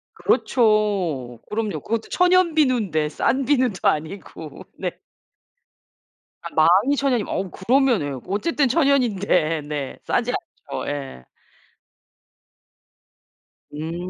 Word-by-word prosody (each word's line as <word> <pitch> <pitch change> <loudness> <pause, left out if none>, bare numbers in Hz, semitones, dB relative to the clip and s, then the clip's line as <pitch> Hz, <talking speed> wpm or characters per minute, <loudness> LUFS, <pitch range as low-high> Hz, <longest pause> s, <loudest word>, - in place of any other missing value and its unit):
그렇죠. 195 - +1
그럼요. 210 -7 -2
그것도 225 0 -3
천연 360 -2 +3
비누인데 215 - +1
싼 260 - 0
비누도 250 -8 +1
아니고 160 -2 -4
네. - - -3 1.5
아 - - -5
망이 190 - +4
천연이면 255 -6 0
어 190 -1 -2
그러면은 240 - +2
예 - - -7
어쨌든 270 - 0
천연인데. 205 - +2
네. 145 -3 -4
싸지 - - 0 0.4
않죠. - - -4
예. 135 - -5 2.5
음. 165 +4 -5
205 Hz, 215 characters per minute, -22 LUFS, 155-260 Hz, 2.5 s, 망이